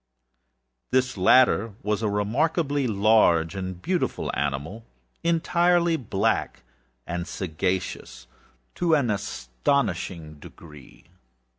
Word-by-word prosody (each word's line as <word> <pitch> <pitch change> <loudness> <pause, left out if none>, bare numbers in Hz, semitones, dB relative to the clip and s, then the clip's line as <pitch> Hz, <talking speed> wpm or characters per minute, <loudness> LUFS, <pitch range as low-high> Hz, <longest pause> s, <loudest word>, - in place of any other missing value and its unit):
This 130 0 +1
latter 110 +1 +4
was 105 +1 -1
a 110 - 0
remarkably 140 - 0
large 100 -6 +3
and 95 -2 -5
beautiful 180 - -2
animal, 70 +10 -3 0.4
entirely 170 0 +2
black, 110 - -1 0.4
and 85 0 -4
sagacious 90 -7 -3 0.5
to 170 -2 +2
an 130 -7 +1
astonishing 85 - -2
degree. 75 -2 -14
105 Hz, 90 wpm, -25 LUFS, 85-140 Hz, 0.5 s, latter